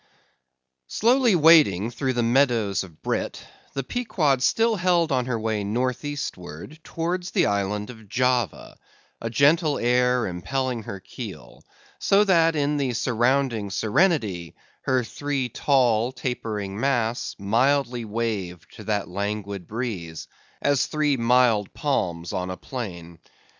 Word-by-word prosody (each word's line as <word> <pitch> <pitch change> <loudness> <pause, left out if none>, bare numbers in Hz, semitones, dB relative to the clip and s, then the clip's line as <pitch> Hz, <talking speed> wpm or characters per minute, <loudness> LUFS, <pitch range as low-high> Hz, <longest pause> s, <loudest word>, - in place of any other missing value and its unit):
Slowly 240 -1 +3
wading 150 - +5
through 130 +2 -2
the 120 -1 0
meadows 115 -6 +2
of 85 -5 -15
brit, - - -3 0.3
the 135 - -2
Pequod 155 - 0
still 225 - +2
held 175 -3 +2
on 130 -2 +1
her 120 -3 -1
way 110 -2 -1
north 125 +6 -1
eastward 140 - -6
towards 175 +2 -3
the - - +2
island 100 +2 -1
of 110 -4 -15
Java; 125 -2 -1 0.4
a 115 - -3
gentle 145 +5 +3
air 125 0 +2
impelling 125 +7 -2
her 100 -2 -7
keel, - - -10 0.4
so 200 +1 +4
that 165 -5 +3
in 145 0 0
the 135 -3 -1
surrounding 120 -2 +1
serenity 105 - 0 0.3
her 130 -1 +2
three 140 +1 -3
tall 120 -3 +2
tapering 110 -6 -4
masts 120 -3 0
mildly 120 +4 +1
waved 105 -6 -4
to 110 - -10
that 105 -1 -1
languid 100 0 -4
breeze, 100 -9 -5 0.4
as 145 0 +2
three 150 -2 +1
mild 115 -4 +2
palms 90 - -1
on 90 0 -2
a 90 - -5
plain. 85 - -7
120 Hz, 130 wpm, -24 LUFS, 105-140 Hz, 0.4 s, wading